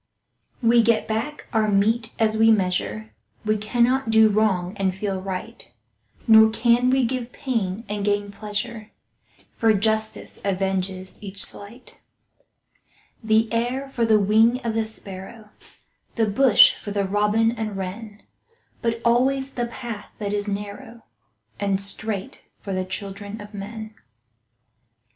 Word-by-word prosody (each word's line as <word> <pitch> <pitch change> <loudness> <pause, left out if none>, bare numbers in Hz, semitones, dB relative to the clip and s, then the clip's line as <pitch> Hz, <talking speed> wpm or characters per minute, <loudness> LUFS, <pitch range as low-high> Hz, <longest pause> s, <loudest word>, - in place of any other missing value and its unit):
We 235 +1 +5
get 230 -1 +2
back 225 +7 -3
our 220 -1 +2
mete 220 +3 +1
as 220 -1 +2
we 225 +1 +5
measure— 215 +2 -1 0.3
We 215 0 +2
cannot 235 +4 +1
do 220 -1 +6
wrong 200 -3 +1
and 190 -2 0
feel 190 -1 -3
right, 185 -8 -7 0.6
Nor 220 -1 +8
can 235 +2 +2
we 260 -1 +3
give 250 0 -3
pain 225 -7 -3
and 205 0 -3
gain 205 0 0
pleasure, 215 +2 -5 0.6
For 225 -1 +3
justice 220 +1 -1
avenges 190 -1 -2
each 200 -1 -3
slight. 220 +5 -8 1.3
The 220 +1 +2
air 250 +4 -1
for 245 -3 -2
the 220 -2 +4
wing 220 +5 +4
of 230 - 0
the 225 0 0
sparrow, 210 +1 -8 0.6
The 225 - +2
bush 215 +2 +6
for - - -9
the 200 -1 -1
robin 210 +3 +2
and 220 -3 -4
wren, 205 +3 -7 0.6
But 230 0 -1
alway 255 +4 +3
the 260 -3 -3
path 235 -3 -8
that 205 -1 -3
is 205 0 0
narrow 205 +3 -6 0.6
And 200 -1 0
straight, 200 0 -4
for 195 - -5
the 185 0 -1
children 200 +2 -6
of 205 +1 -11
men. 215 +2 -7
215 Hz, 135 wpm, -23 LUFS, 200-230 Hz, 1.3 s, Nor